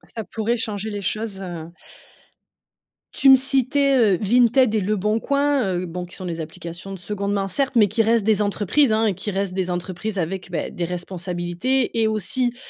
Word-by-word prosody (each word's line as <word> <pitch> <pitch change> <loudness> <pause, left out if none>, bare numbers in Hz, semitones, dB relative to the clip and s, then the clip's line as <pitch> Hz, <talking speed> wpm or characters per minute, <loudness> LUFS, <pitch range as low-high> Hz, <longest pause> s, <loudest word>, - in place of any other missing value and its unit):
Ça 225 - -3
pourrait 225 +3 -2
changer 215 -1 -3
les 205 -1 -4
choses, 215 -1 -3
heu 170 -3 -7 1.4
Tu 270 - +4
me 265 - +10
citais, 275 +1 +2
heu, 210 -7 +4
Vinted 240 +2 +3
et 215 - +1
Leboncoin, 220 +4 0
heu, 180 +1 -2
bon, 180 +1 -5
qui 180 +2 -10
sont 185 - -7
des 165 -2 -4
applications 170 +4 -8
de 195 - -6
2de 200 +2 -4
main, 195 -1 -1
certes, 270 +7 -1
mais 215 -3 +6
qui 225 +4 +1
restent 225 -1 +2
des 210 -1 +2
entreprises, 210 +6 +2
hein 220 +1 +2
et 205 - +2
qui 205 - -5
restent 195 -1 -2
des 185 -1 -2
entreprises 185 +4 -4
avec, 180 +2 -3
bah, 175 - -3
des 175 - -4
responsabilités 180 +7 -2
et 220 - +3
aussi, 240 +4 0
205 Hz, 190 wpm, -22 LUFS, 185-235 Hz, 1.4 s, me